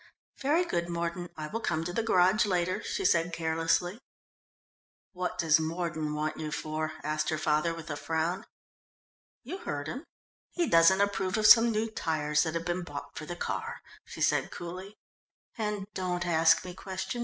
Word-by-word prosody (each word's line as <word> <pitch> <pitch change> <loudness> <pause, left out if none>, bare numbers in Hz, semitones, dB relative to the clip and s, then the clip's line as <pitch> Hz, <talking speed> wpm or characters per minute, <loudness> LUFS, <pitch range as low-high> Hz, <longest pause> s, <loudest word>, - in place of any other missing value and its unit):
"Very 310 +6 +2
good, 170 - -1
Mordon, 170 +1 -3
I 155 - -4
will 220 +9 -4
come 165 -7 -1
to 175 +1 -4
the 230 - +1
garage 200 -1 +4
later," 185 +2 0
she 390 - -3
said 170 - +3
carelessly. 165 +4 0 1.1
"What 180 -1 -3
does 160 -2 +4
Mordon 160 -2 -2
want 155 +1 -2
you 155 -1 -4
for?" 155 +1 -3
asked 155 +1 -1
her 155 - 0
father, 155 +2 +1
with 165 -1 -7
a - - -2
frown. 165 +4 -2 1.0
"You 380 - -6
heard 145 - -4
him. 265 - -6 0.5
He 345 -2 +1
doesn't 165 +4 +6
approve 195 -1 0
of 215 - +1
some 230 +2 +9
new 220 +1 0
tyres 150 -7 0
that 160 0 -1
have 165 0 -2
been 175 +1 -1
bought 145 -4 -8
for 155 - -7
the 175 - -4
car," - - -4 0.2
she - - -10
said - - +2
coolly. 185 +4 -8 0.6
"And 210 -3 -2
don't 180 -2 -2
ask 165 0 +4
me 180 - -6
questions. 190 +6 -5
175 Hz, 175 wpm, -29 LUFS, 160-190 Hz, 1.1 s, some